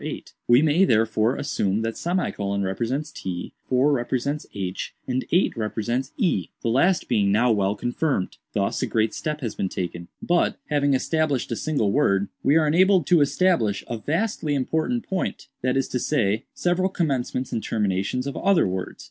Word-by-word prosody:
We 120 +4 +6
may, 160 +4 +4
therefore, 110 - +2
assume 105 -6 -1
that; 115 0 -3 0.6
represents 120 +10 -2
t, 90 -9 -6 0.2
4 130 +3 +3
represents 140 +3 -1
h, 95 -2 -5
and 130 0 -1
8 180 +3 +3
represents 120 +4 -2
e—the 145 - -1
last 150 +10 +2
being 100 -2 +2
now 115 +4 +3
well 100 -1 +1
confirmed. 120 -1 -1 0.2
Thus - - 0
a - - 0
great 110 0 +1
step 150 0 -3
has 115 -4 -3
been 95 - -2
taken. 85 -1 -5
"But, 175 0 +1
having 145 -2 +3
established 150 -2 0
a - - 0
single 125 -8 0
word, 100 -7 +2
we 145 - +4
are 160 - +3
enabled 180 +2 +4
to 175 -3 +6
establish 145 - +2
a 115 - -4
vastly 160 - -1
important 160 - -1
point; 190 -1 -3
that 130 +1 +1
is 135 - +1
to 125 - -1
say, 110 -7 0
several 180 +2 +1
commencements 130 -7 -1
and 115 - -2
terminations 105 +4 -1
of 140 - -4
other 195 - +3
words. 95 0 -4
130 Hz, 165 wpm, -24 LUFS, 110-155 Hz, 0.6 s, We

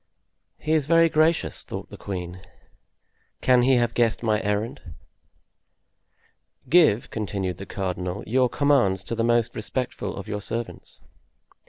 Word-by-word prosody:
"He 155 - -4
is 155 -3 +2
very 165 0 +5
gracious," 160 +2 +1
thought - - -7
the - - -8
queen; 90 -2 -6 1.0
"can 125 -1 +4
he 130 +2 +4
have 120 -1 +1
guessed 120 -1 +1
my 110 -1 +1
errand?" 110 +6 -2 1.9
"Give," 155 -10 +4
continued 100 -4 -3
the 95 - -8
cardinal, 90 -1 -4
"your 125 +3 +2
commands 125 -11 +2
to 105 - -5
the 115 0 0
most 120 -1 +1
respectful 110 -3 -3
of 100 - -7
your 105 -1 -4
servants." 115 +3 -6
115 Hz, 135 wpm, -24 LUFS, 100-130 Hz, 1.9 s, very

